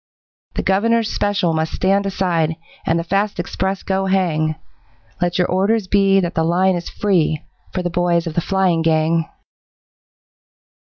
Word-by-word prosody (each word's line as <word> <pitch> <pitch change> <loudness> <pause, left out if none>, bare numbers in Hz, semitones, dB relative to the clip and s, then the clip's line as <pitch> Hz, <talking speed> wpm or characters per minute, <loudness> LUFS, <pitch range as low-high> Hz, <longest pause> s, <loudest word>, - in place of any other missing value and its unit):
The - - -1
Governor's 225 +3 +2
special 200 -5 +1
must 160 0 -1
stand 195 +1 +1
aside, 170 -5 0 0.3
And 165 - +2
the 170 - -1
fast 195 +3 -1
express 190 +2 -2
go 195 0 -1
hang, 160 -5 +1 0.7
Let 175 0 0
your 180 - +3
orders 195 +2 +1
be 195 0 +4
that 175 -2 -2
the 160 - +1
line 180 +3 +2
is 170 -1 -5
free 170 -7 0 0.3
For 185 - -3
the 175 - -2
boys 175 0 +1
of 165 - -4
the 170 - 0
flying 185 -3 +1
gang. 160 0 +1
180 Hz, 155 wpm, -19 LUFS, 165-195 Hz, 0.7 s, be